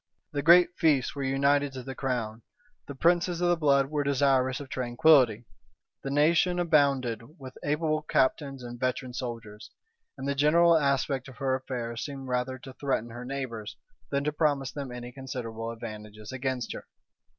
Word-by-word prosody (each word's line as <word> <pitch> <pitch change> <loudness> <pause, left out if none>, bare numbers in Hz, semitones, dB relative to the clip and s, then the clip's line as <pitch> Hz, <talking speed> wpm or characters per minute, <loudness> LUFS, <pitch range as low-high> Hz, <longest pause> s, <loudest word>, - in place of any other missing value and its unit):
The 145 - -2
great 170 +3 +7
fiefs 145 -6 +3
were 140 - -5
united 140 +1 +2
to 130 -1 -7
the 135 - -6
crown; 120 -5 -3 0.5
the 140 - -7
princes 175 +3 +2
of 175 0 +2
the 175 - +4
blood 140 -3 +2
were 150 -1 0
desirous 135 -2 +2
of 145 - -8
tranquillity; 125 -2 +3 0.6
the 135 - -5
nation 160 +5 +3
abounded 140 -9 +2 0.2
with 130 -3 -10
able 155 +1 0
captains 135 -2 0
and 120 0 -8
veteran 130 0 -2
soldiers; 115 -4 -7 0.5
and 135 +1 -5
the 140 - +1
general 165 +4 +5
aspect 140 -3 +1
of 130 - -12
her 135 -1 0
affairs 120 -3 -4
seemed 135 -2 -7
rather 125 +1 -1
to 130 +1 -11
threaten 130 -4 -2
her 120 +2 -8
neighbors, 125 -6 -5 0.3
than 140 0 0
to 150 - 0
promise 145 -4 0
them 140 -3 -6
any 125 0 -7
considerable 120 -4 -6
advantages 105 -1 -8
against 130 -1 -3
her. - - -9
135 Hz, 165 wpm, -28 LUFS, 125-145 Hz, 0.6 s, great